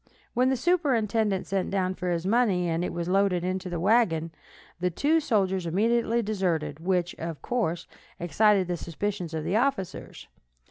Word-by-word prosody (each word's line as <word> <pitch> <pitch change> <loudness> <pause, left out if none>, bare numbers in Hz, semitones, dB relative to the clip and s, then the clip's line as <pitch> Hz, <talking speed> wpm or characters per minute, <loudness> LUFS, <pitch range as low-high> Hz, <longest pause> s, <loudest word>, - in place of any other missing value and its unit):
When 255 +1 +3
the 265 - +1
superintendent 230 - +1
sent 195 -2 -1
down 190 -1 0
for 180 -1 -4
his 170 0 -1
money, 200 -5 +2
and 165 +1 0
it - - -2
was 170 0 -4
loaded 190 -2 +2
into 185 0 -2
the 175 -1 -3
wagon, 175 -5 +2 0.5
the 180 +1 +1
two 295 - +2
soldiers 190 - 0
immediately 230 +5 +1
deserted, 170 -8 -1
which, 180 0 0
of 165 -3 -5
course, 180 -9 -1 0.3
excited 190 +3 +3
the 175 -1 -2
suspicions 175 0 -4
of 155 - -3
the 195 - 0
officers. 230 -7 -2
190 Hz, 165 wpm, -27 LUFS, 175-220 Hz, 0.5 s, When